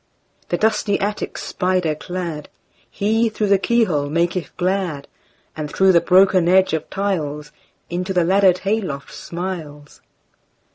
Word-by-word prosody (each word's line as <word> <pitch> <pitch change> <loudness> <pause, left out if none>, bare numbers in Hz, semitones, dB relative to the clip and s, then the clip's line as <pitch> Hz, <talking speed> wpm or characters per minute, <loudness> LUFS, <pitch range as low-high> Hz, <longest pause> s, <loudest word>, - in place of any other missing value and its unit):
The - - 0
dusty 215 -2 +1
attic 205 +1 -3
spider 180 -4 -1
cladHe, 185 +7 -3
through 215 0 -1
the 200 -1 +4
keyhole, 185 -11 +1
maketh 170 +3 -1
glad; 180 -6 -1 0.5
And 150 -1 -5
through 190 0 +4
the 170 -2 +4
broken 185 -1 +4
edge 190 -1 +4
of 160 -1 -2
tiles, 155 -7 -3 0.4
Into 180 +2 -3
the 180 -2 +2
laddered 190 +1 +4
hay 215 +3 +1
loft 140 -8 -6
smiles. 165 -5 -7
185 Hz, 130 wpm, -20 LUFS, 160-195 Hz, 0.5 s, the